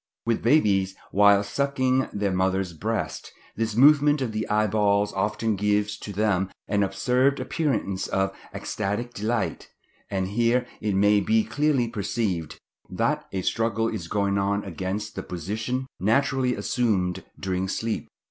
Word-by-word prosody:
With 115 -1 0
babies, 100 -8 +3 0.2
whilst 100 0 +4
sucking 130 -2 +1
their 100 -1 -1
mother's 95 -1 0
breast, 80 - -3 0.2
this 115 -1 -2
movement 145 +3 +6
of 130 -4 -2
the 110 0 -3
eyeballs 105 -1 +2
often 105 +2 0
gives 105 +1 +1
to 105 - -7
them 100 -2 +1 0.2
an 100 -1 +1
absurd 125 +8 +2
appearance 130 - -1
of 95 0 0 0.2
ecstatic 105 +4 -3
delight; 110 0 -2 0.4
and 95 -2 -1
here 120 +4 +2 0.2
it 105 -2 0
may 105 +1 +4
be 110 +2 +2
clearly 145 -3 +1
perceived 100 -6 -2 0.3
that - - -1
a 95 -1 -3
struggle 115 +1 0
is 95 -7 -5
going 100 +1 0
on 100 +1 0
against 100 +3 -4
the 95 - -3
position 110 +10 -3
naturally 130 +4 +2
assumed 100 -5 0 0.2
during 95 0 -1
sleep. 110 +3 -2
105 Hz, 140 wpm, -25 LUFS, 95-120 Hz, 0.4 s, movement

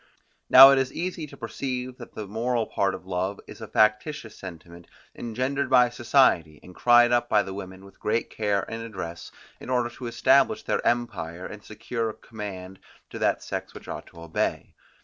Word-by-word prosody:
Now 135 +1 +11
it 135 - +4
is 135 -1 -1
easy 170 -2 -4
to - - -13
perceive 130 -1 -5
that 120 - -11
the 110 - -5
moral 115 +2 -1
part 95 -1 0
of 95 - -12
love 95 +2 -2
is - - -12
a - - -6
factitious 110 +3 +1
sentiment, 85 -1 -11 0.3
engendered 130 +4 -2
by 125 -2 +5
society, 110 - +2
and 90 - -13
cried 120 +3 +5
up 120 0 +2
by 105 -1 +4
the 95 - -7
women 95 -1 -9
with 100 - -17
great 115 +2 -1
care 105 -2 0
and 115 0 -5
address 95 -7 -7 0.3
in - - -10
order 120 -2 0
to 120 0 -8
establish 140 - +3
their - - -1
empire, 95 -8 -2
and 105 -1 -9
secure 115 +1 -4
command 95 -5 -8 0.3
to - - -7
that - - +1
sex - - -5
which - - -11
ought - - -7
to 85 - -15
obey. 85 -1 -2
115 Hz, 185 wpm, -26 LUFS, 95-125 Hz, 0.3 s, Now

